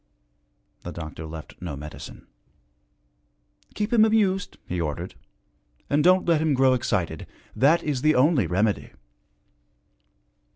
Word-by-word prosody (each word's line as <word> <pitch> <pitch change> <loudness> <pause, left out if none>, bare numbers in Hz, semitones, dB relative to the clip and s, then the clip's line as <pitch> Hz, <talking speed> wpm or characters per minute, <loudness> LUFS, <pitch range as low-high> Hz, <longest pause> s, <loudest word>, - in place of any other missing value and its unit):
The - - -7
doctor 80 -1 -7
left 80 0 -10
no 85 -5 -5
medicine. 75 +2 -10 1.5
'Keep 210 +2 -2
him 220 -2 +6
amused,' 205 -4 +1
he 90 -1 -2
ordered, 75 -3 -4 0.8
'and 145 +1 +3
don't 185 +1 +4
let 165 -3 +3
him 155 -3 +2
grow 130 0 +4
excited. 90 -10 -2 0.3
That 150 +6 +4
is 145 -4 -2
the 155 +2 +3
only 130 - +3
remedy.' 100 +4 0
130 Hz, 120 wpm, -25 LUFS, -, 1.5 s, him